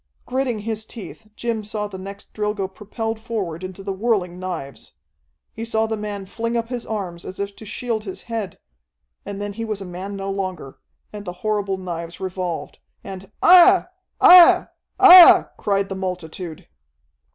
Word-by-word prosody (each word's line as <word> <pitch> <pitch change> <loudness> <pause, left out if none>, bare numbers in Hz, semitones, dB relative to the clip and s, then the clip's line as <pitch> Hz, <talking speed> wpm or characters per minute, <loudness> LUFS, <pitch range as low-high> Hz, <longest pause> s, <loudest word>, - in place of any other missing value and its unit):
Gritting 255 -2 -1
his 215 +1 -4
teeth, 220 -1 -11
Jim 230 -2 -3
saw 210 0 -4
the 195 -2 -8
next 195 +1 -10
Drilgo 210 -2 -2
propelled 220 +3 -5
forward 200 -7 -4
into 185 +1 -8
the 195 - -3
whirling 190 -4 -1
knives. 175 -7 -7 0.6
He 225 - -6
saw 220 -1 0
the 220 0 -2
man 205 -2 -5
fling 230 +4 -3
up 230 0 -3
his 245 -2 -5
arms, 185 -6 -5
as 185 - -9
if 200 0 -4
to 220 - -11
shield 220 +1 -3
his 190 -3 -8
head 225 -4 -5 0.7
and 200 -1 -6
then 205 0 -4
he 230 +3 -5
was 215 -3 -4
a 195 - -7
man 185 +3 -7
no 195 0 -4
longer, 185 -8 -5 0.3
and 205 -1 -7
the 180 -3 -6
horrible 205 -2 0
knives 170 -2 -7
revolved, 185 -3 -5 0.2
and 190 0 -9
"Aiah! 365 +1 +7 0.3
Aiah! 355 -1 +8 0.3
Aiah!" 370 -2 +9
cried 200 -1 0
the 195 - -5
multitude. 180 -3 -6
200 Hz, 165 wpm, -21 LUFS, 185-225 Hz, 0.7 s, Aiah